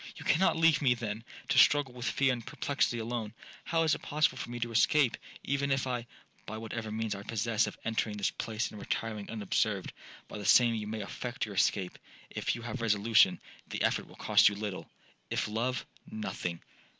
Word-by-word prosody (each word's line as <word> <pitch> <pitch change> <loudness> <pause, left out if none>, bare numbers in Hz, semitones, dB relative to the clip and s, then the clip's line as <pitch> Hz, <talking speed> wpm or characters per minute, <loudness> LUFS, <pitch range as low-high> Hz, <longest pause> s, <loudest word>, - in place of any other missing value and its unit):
'—'You - - -10
cannot 175 +1 +3
leave 165 -2 +4
me, 125 -4 +4
then, 115 -1 -4 0.3
to 135 0 +5
struggle 145 -3 +5
with 125 0 -5
fear 135 -2 +2
and 120 -2 -5
perplexity 140 0 -1
alone! 115 -1 -4 0.3
How 165 0 +1
is 160 - +3
it - - -3
possible 150 +1 +1
for - - -5
me 120 0 -5
to 120 0 -2
escape, 120 +4 +4 0.3
even 140 0 0
if'—'By 130 -3 -1 0.5
whatever 110 0 -5
means 110 0 -2
I 100 - -6
possess 110 +1 0
of - - -7
entering 110 -2 -1
this 100 - 0
place 110 0 -3
and 105 - -9
retiring 105 -1 -3
unobserved,—by 105 -2 -3
the - - -6
same 115 +3 +6
you 110 -2 -3
may 110 0 -4
effect 120 +5 -4
your 105 - -8
escape. 95 -1 +1 0.3
If - - -1
you 120 - -8
have 120 +1 -5
resolution, 110 0 +4 0.3
the - - -3
effort - - +1
will - - -15
cost - - +5
you 100 - -5
little,—if 95 - -5
love,—nothing. 125 - -4
115 Hz, 180 wpm, -31 LUFS, 105-130 Hz, 0.5 s, same